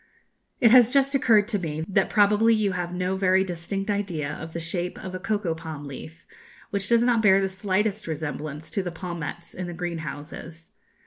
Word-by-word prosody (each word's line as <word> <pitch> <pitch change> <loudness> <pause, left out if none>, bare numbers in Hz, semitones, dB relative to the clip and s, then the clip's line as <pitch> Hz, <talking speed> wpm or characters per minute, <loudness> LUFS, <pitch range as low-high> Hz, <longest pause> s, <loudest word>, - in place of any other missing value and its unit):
"It 230 - +6
has 245 -2 +8
just 275 +1 +2
occurred 225 -6 +4
to 210 -4 0
me 160 -2 -3
that 195 -1 +2
probably 210 +2 +4
you 210 -2 +1
have 175 -1 -3
no 180 +1 -1
very 190 0 +3
distinct 195 +3 -3
idea 180 -8 -2
of 160 0 -8
the 170 - -3
shape 175 +2 -3
of 185 - -7
a 185 - -4
cocoa 195 -3 -1
palm 160 -3 -7
leaf, 155 +4 -10 0.5
which 200 -1 -2
does 235 0 +4
not 240 -2 +3
bear 195 -3 +6
the 195 - +1
slightest 195 +2 -1
resemblance 155 0 -5
to 200 - 0
the 180 - -4
palmettes 170 -1 -6
in 185 -1 -5
the 175 - -5
greenhouses. 165 -1 -6
185 Hz, 190 wpm, -25 LUFS, 165-205 Hz, 0.5 s, has